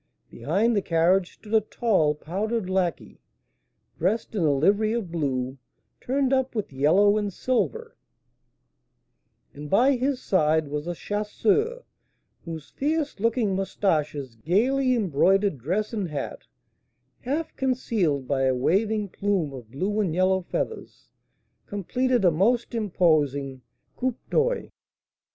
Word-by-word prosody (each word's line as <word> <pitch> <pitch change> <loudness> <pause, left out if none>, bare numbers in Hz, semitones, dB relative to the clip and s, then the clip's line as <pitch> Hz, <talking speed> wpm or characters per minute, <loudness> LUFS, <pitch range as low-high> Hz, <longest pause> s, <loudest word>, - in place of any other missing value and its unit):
Behind 195 - +1
the 200 - +2
carriage 175 +2 +2
stood 215 0 -11
a 220 - +5
tall 195 -9 +1
powdered 200 +7 -3
lacquey, 185 -3 -2 0.8
dressed 210 +8 0
in 205 - -1
a 155 -3 +3
livery 200 +10 +2
of 220 -8 -3
blue 135 -5 -2 0.4
turned 270 +1 0
up 265 -1 0
with 210 -10 -3
yellow 190 +10 +4
and 205 -1 -2
silver; 455 - -2 1.6
and 145 +1 -8
by 245 - +4
his 260 +1 -1
side 160 - +1
was 150 +2 -4
a 175 - -3
chasseur, 410 - 0 0.6
whose 160 -3 -7
fierce 295 -3 -1
looking 225 -2 +1
moustaches, 155 - -1
gaily 250 - +1
embroidered 195 - +2
dress 190 - -2
and 205 -5 -2
hat, 145 -3 -5 0.7
half 290 +6 -3
concealed 210 - 0
by 135 -2 +1
a 130 -1 +2
waving 205 - +1
plume 190 -6 -1
of 120 -5 -10
blue 190 - -2
and 180 -7 0
yellow 185 +1 +2
feathers, 445 - -5 0.6
completed 240 +3 0
a 175 - +6
most 230 +10 +1
imposing 150 - +1 0.4
coup 255 -1 -1 0.2
d'oeil. - - +1
195 Hz, 125 wpm, -25 LUFS, 155-235 Hz, 1.6 s, a